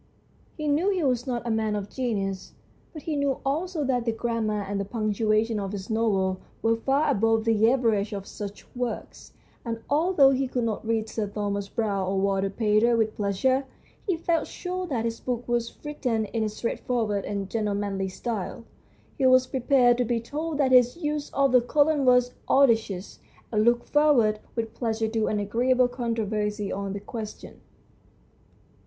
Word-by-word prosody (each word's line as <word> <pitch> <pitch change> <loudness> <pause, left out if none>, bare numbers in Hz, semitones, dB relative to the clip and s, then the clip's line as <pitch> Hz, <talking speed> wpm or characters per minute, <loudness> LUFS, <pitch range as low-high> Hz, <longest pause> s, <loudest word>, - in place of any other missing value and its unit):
He 305 -1 -3
knew 305 +7 +2
he 375 -4 0
was 250 -2 0
not 240 -1 -2
a 235 - -1
man 220 -1 0
of 200 -1 -3
genius, 200 -7 -3 0.4
but 310 - -9
he 315 - -2
knew 280 -2 0
also 315 +3 -1
that 250 -3 0
the 230 - 0
grammar 225 -2 -1
and 200 0 -3
the - - 0
punctua 215 +1 +1
tion 225 -2 -2
of 195 0 -4
his 200 +2 -5
novel 195 -4 +1 0.2
were 225 0 +3
far 275 +6 +1
above 225 -1 +2
the 225 0 +4
average 225 -5 +1
of 200 -2 -5
such 205 0 -8
works, 245 -2 -5 0.3
and 230 -1 -4
although 300 -2 +5
he 265 0 0
could 250 -1 -2
not 225 -2 -2
read 225 -1 0
Sir 215 -1 -3
Thomas 200 -1 -3
Browne 200 -5 -1
or 190 0 0
Walter 195 0 +1
Pater 220 +3 +2
with 220 -1 0
pleasure, 220 +7 +1 0.4
he 370 -4 +1
felt 335 0 0
sure 365 0 -4
that 240 -7 -1
his 230 0 -3
book 245 -1 -3
was 240 -1 -1
written 250 -7 -1
in 225 +1 -2
a 215 - 0
straightforward 220 -2 -2
and 200 -1 -3
gentlemanly 200 -2 -1
style. 215 +2 -4 0.6
He 265 - +4
was 255 0 +6
prepared 250 -1 +3
to - - +4
be 235 0 0
told 300 +6 -4
that 275 -3 +2
his 250 +2 +5
use 300 -3 -2
of 275 -1 +2
the 250 -1 +6
colon 290 +3 +2
was 250 0 +4 0.2
audacious, 225 -8 +2 0.3
and 215 -2 +2
looked 240 +1 +2
forward 260 -8 +3 0.2
with 225 -1 -3
pleasure 225 -2 -1
to 220 -1 0
an 210 - 0
agreeable 245 +5 +2
controversy 215 -4 -2
on 195 0 -3
the 200 - -4
question. 215 +1 -8
230 Hz, 175 wpm, -26 LUFS, 210-260 Hz, 0.6 s, was